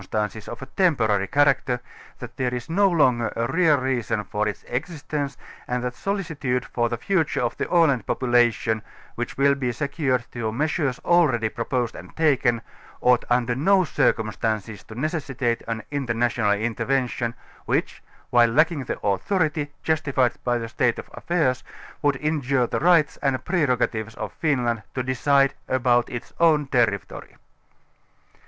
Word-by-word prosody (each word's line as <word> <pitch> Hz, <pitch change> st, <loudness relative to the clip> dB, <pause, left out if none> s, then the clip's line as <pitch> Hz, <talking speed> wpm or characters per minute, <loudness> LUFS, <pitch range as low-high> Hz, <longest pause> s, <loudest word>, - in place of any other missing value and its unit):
tances 105 Hz, 0 st, -2 dB
of -, -, -7 dB
a -, -, -5 dB
temporary 115 Hz, -, +1 dB
character, 135 Hz, 0 st, +2 dB, 0.4 s
that -, -, -9 dB
there 125 Hz, -1 st, -1 dB
is 120 Hz, +2 st, -5 dB
no 195 Hz, +3 st, +4 dB
longer 130 Hz, -9 st, +2 dB
a 115 Hz, -, 0 dB
real 160 Hz, +2 st, +3 dB
reason 125 Hz, -5 st, -1 dB
for 105 Hz, +2 st, -2 dB
its 105 Hz, -, -4 dB
existence 145 Hz, 0 st, -4 dB, 0.3 s
and 125 Hz, 0 st, -2 dB
that 125 Hz, -1 st, -2 dB
solicitude 160 Hz, -, -2 dB
for 120 Hz, -1 st, -1 dB
the 120 Hz, -, -2 dB
future 165 Hz, -, 0 dB
of 120 Hz, -, -1 dB
the -, -, -3 dB
Aland 150 Hz, -, +3 dB
population, 120 Hz, -3 st, +2 dB, 0.3 s
which 120 Hz, -, -5 dB
will 140 Hz, +1 st, +4 dB
be 130 Hz, -3 st, -1 dB
secured 140 Hz, -2 st, -1 dB
through 110 Hz, -2 st, -3 dB
measures 145 Hz, -1 st, 0 dB
20 175 Hz, -, +3 dB
already 125 Hz, -10 st, +3 dB
proposed 120 Hz, +1 st, -2 dB
and -, -, -11 dB
taken, 125 Hz, -7 st, +2 dB, 0.4 s
ought 125 Hz, -1 st, +3 dB
under 120 Hz, -1 st, +2 dB
no 185 Hz, +9 st, +3 dB
circumstances 110 Hz, -, -1 dB
to 110 Hz, +2 st, -9 dB
necessitate 135 Hz, -6 st, -1 dB
an 115 Hz, -1 st, -3 dB
international 120 Hz, -5 st, +1 dB
intervention, 120 Hz, +2 st, -1 dB, 0.3 s
which, -, -, -1 dB, 0.3 s
while 120 Hz, -1 st, +5 dB
lacking 155 Hz, +2 st, +2 dB
the -, -, -4 dB
authority, 150 Hz, -, 0 dB
justified 140 Hz, -6 st, +1 dB
by 120 Hz, -1 st, +1 dB
the 115 Hz, -1 st, -4 dB
state 115 Hz, +1 st, +1 dB
of -, -, -9 dB
affairs, 155 Hz, -8 st, 0 dB, 0.4 s
would 145 Hz, -1 st, +2 dB
injure 140 Hz, -3 st, 0 dB
the -, -, -2 dB
rights 165 Hz, -3 st, +4 dB
and 135 Hz, -2 st, 0 dB
prerogatives 125 Hz, -, 0 dB
of -, -, -6 dB
Finland 125 Hz, -7 st, 0 dB
to 130 Hz, -, -1 dB
decide 135 Hz, +2 st, +2 dB, 0.2 s
about 120 Hz, -1 st, +2 dB
its 120 Hz, +2 st, -7 dB
own 155 Hz, -3 st, +4 dB
territory. 115 Hz, -7 st, -1 dB
125 Hz, 150 wpm, -24 LUFS, 120-150 Hz, 0.4 s, while